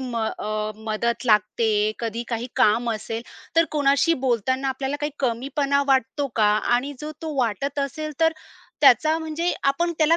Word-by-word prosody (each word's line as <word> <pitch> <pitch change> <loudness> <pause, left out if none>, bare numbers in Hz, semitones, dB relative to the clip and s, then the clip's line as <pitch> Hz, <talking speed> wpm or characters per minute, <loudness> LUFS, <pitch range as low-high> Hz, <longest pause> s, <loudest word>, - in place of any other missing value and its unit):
म 250 -3 -4 0.2
अ, 215 0 -2 0.2
मदत 235 +3 -1
लागते? 215 0 +2
कधी 230 0 -3
काही 235 0 -2
काम 230 +3 +3
असेल, 225 +2 -5 0.3
तर 330 - +6
कोणाशी 290 +2 +3
बोलताना 260 +3 0
आपल्याला 265 +2 -2
काही 295 -1 -2
कमीपणा 275 +3 0
वाटतो 270 +2 +1
का? 210 -2 +4 0.2
आणि 275 +4 -1
जो 305 +1 -5
तो 315 -2 -4
वाटत 255 +5 -1
असेल, 305 +3 -3
तर 325 0 +4 0.5
त्याचा 305 +3 +5
म्हणजे 325 +2 -2 0.2
आपण 340 +5 -1
त्याला 320 +1 +4
265 Hz, 155 wpm, -23 LUFS, 230-295 Hz, 0.5 s, तर